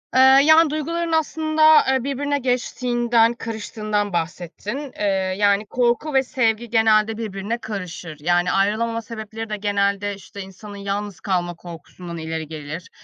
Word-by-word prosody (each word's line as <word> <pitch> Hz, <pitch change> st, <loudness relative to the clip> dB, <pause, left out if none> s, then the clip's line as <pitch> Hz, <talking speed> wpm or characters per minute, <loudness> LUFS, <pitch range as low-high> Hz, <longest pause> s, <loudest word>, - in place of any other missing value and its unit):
Eee, -, -, +5 dB, 0.2 s
yani 315 Hz, +1 st, +6 dB
duyguların 330 Hz, +3 st, -2 dB
aslında, 315 Hz, -1 st, +4 dB
eee, 260 Hz, -, 0 dB
birbirine 285 Hz, +1 st, -1 dB
geçtiğinden, 240 Hz, -2 st, +1 dB
karıştığından 215 Hz, -3 st, -3 dB
bahsettin. 180 Hz, -, -4 dB
Eee, -, -, -2 dB, 0.3 s
yani 205 Hz, 0 st, +3 dB
korku 245 Hz, +6 st, 0 dB
ve 265 Hz, 0 st, +4 dB
sevgi 235 Hz, -4 st, 0 dB
genelde 220 Hz, -1 st, +3 dB
birbirine 210 Hz, 0 st, -4 dB
karışır. 180 Hz, -8 st, -7 dB
Yani 175 Hz, +3 st, +1 dB
ayrılamama 220 Hz, +4 st, +1 dB
sebepleri 225 Hz, -1 st, -7 dB
de 210 Hz, -, -3 dB
genelde, 200 Hz, 0 st, 0 dB
işte, 195 Hz, +1 st, -10 dB
insanın 195 Hz, +2 st, -10 dB
yalnız 200 Hz, 0 st, -4 dB
kalma 175 Hz, -3 st, -1 dB
korkusundan 170 Hz, 0 st, -10 dB
ileri 160 Hz, -1 st, -4 dB
gelir, 155 Hz, +2 st, -7 dB
215 Hz, 135 wpm, -22 LUFS, 195-245 Hz, 0.3 s, yani